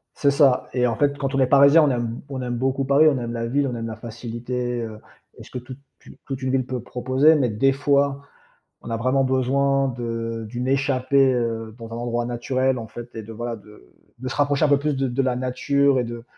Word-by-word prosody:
C'est 140 -1 +2
ça 140 -3 +3
et 125 -1 +2
en 115 - -1
fait, 140 +3 +1
quand 135 -1 -3
on 135 - +1
est 130 - +4
parisien, 140 +4 +6
on 150 - +3
aime 120 -1 -3
on 130 -2 -4
aime 120 -1 -3
beaucoup 135 +2 0
Paris, 145 +3 +5
on 140 - 0
aime 120 -1 -4
la 115 0 -3
ville, 140 +3 +1
on 125 - -3
aime 115 0 -4
la 110 - -6
facilité, 120 +2 -4
heu, 110 -1 -7 0.4
et - - -11
ce - - -15
que 125 - -6
toute, 130 +2 -9 0.3
heu, - - -13
toute 135 -2 -5
une 130 - 0
ville 130 -1 +1
peut 125 -1 -4
proposer, 130 +6 +2
mais 135 -5 +1
des 115 +6 +2
fois, 140 0 +1 0.6
on - - -9
a 115 - -1
vraiment 130 +3 +1
besoin 135 +1 +1
de 115 -1 -4
d'une 120 +3 -4
échappée, 135 0 +2
heu, 115 -2 -2
dans 115 -1 -10
un - - -4
endroit 120 0 -2
naturel, 130 +2 0
en 115 - -6
fait, 120 +2 -10
et 110 - -6
de 115 - -10
voilà, 120 +1 -4
de 105 -1 -17 0.3
de 130 - -6
se 130 - -4
rapprocher 145 +1 +2
un - - +1
peu 145 - +5
plus 150 0 -1
de 135 0 0
de 125 +2 -1
la 130 -2 0
nature 140 +2 +1
et - - 0
de 120 0 -7
130 Hz, 245 wpm, -23 LUFS, 120-135 Hz, 0.6 s, parisien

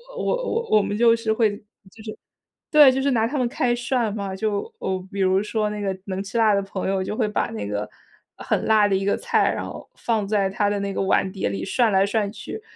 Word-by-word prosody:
我 - - -4
我 - - -1
我 - - +4
们 205 - -3
就 230 +1 +5
是 225 -1 -1
会 220 -1 +3
就 - - -6
是 - - -21 1.1
对， 295 -3 +8
就 265 +1 -1
是 280 0 +1
拿 225 -2 +2
他 285 +4 -3
们 250 - +1
开 240 0 0
涮 240 -3 -1
嘛。 200 -2 -4
就， 210 - -2
哦， 190 - -3
比 200 - -6
如 190 +1 +3
说 210 0 -1
那 210 - -5
个 195 -2 -2
能 190 -1 -3
吃 200 +4 -5
辣 220 -2 +4
的 200 - +2
朋 195 -1 -5
友， 195 -1 0
就 210 +3 -4
会 225 - +1
把 210 - -1
那 105 -2 -5
个 105 0 -3 0.5
很 - - -1
辣 215 -2 +5
的 195 - +1
一 195 - -1
个 200 - +1
菜， - - +1
然 - - -4
后 - - -9
放 220 -4 -1
在 200 -2 +1
他 205 +1 +1
的 205 0 -1
那 200 0 -3
个 - - -2
碗 190 0 +1
碟 190 - -2
里 100 -1 -4
涮 235 -3 +2
来 195 0 +4
涮 205 0 -1
去， 425 - -8
210 Hz, 270 characters per minute, -23 LUFS, 195-230 Hz, 1.1 s, 对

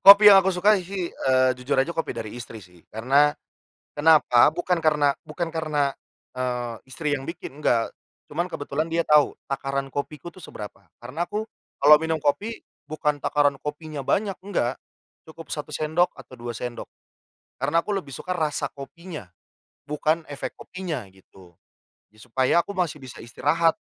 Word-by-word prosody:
Kopi 205 +1 +12
yang 195 - +9
aku 190 - 0
sukai 200 +2 +4
sih, 185 -1 -4
eee, 130 -1 +3
jujur 125 - 0
aja 135 +6 +2
kopi 165 - -2
dari 110 -2 -5
istri 115 -2 -8
sih 90 -1 -20
karena 140 +6 +3 0.6
kenapa, 145 -5 +6
bukan 180 -2 0
karena 150 -3 +3 0.2
bukan 165 +1 -3
karena, 150 -3 0 0.4
eee, 125 -2 -2
istri 150 +3 -3
yang 135 0 -7
bikin, 155 -4 -7
enggak. 115 -6 +2 0.4
Cuman 175 +4 -1
kebetulan 150 -1 -3
dia 165 0 0
tahu 150 -1 +4 0.2
takaran 135 0 -2
kopiku 150 +3 -5
tuh 185 - -15
seberapa. 100 -3 -9 0.2
Karena 160 +8 -3
aku, 210 +1 -2 0.4
kalau 150 +1 +9
minum 160 0 0
kopi 210 +10 -1 0.2
bukan 150 -1 -1
takaran 145 -1 +2
kopinya 150 0 -6
banyak, 195 +6 +1
enggak. 135 -11 -1 0.5
Cukup 165 +1 -11
1 150 - -4
sendok 160 +3 +1
atau - - -13
2 120 0 -6
sendok, 120 +1 -6 0.7
karena 145 +4 +2
aku 210 - -1
lebih 165 -8 -4
suka 180 +7 -4
rasa 150 -3 -1
kopinya, 150 - -9 0.6
bukan 155 +2 +1
efek 145 - -5
kopinya 180 -8 -5
gitu. 95 -2 -19 0.6
Supaya 130 +8 +1
aku 200 +3 -6
masih 170 -5 -1
bisa 130 -3 -10
istirahat, 160 +7 +2
150 Hz, 155 wpm, -25 LUFS, 130-170 Hz, 0.7 s, Kopi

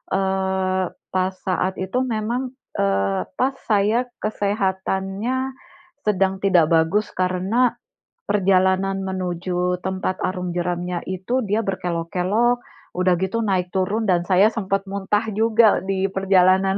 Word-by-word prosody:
eee, 190 -1 0 0.3
pas 185 0 +1
saat 185 0 0
itu 190 +6 -2
memang, 240 +3 -2 0.3
eee, 100 0 +1
pas 260 +2 +3 0.2
saya 215 +4 +2 0.2
kesehatannya 200 +4 -1 0.5
sedang 195 -1 +2
tidak 180 -5 +4
bagus 165 +6 +2
karena 185 +7 +1 0.6
perjalanan 195 -1 +2
menuju 180 -1 -2
tempat 185 0 -3
arung 180 -1 -2
jeramnya 175 0 -2
itu 190 +8 -1
dia 210 +2 0
berkelok-kelok, 185 +6 0 0.3
udah 185 0 +2
gitu 190 +6 -1
naik 185 -4 -1
turun 200 +4 0
dan 180 -4 +3
saya 195 +4 +4
sempat 195 -2 -1
muntah 200 +2 -1
juga 220 +1 +4
di 190 0 -1
perjalanan. 190 0 +3
190 Hz, 115 wpm, -22 LUFS, 185-210 Hz, 0.6 s, tidak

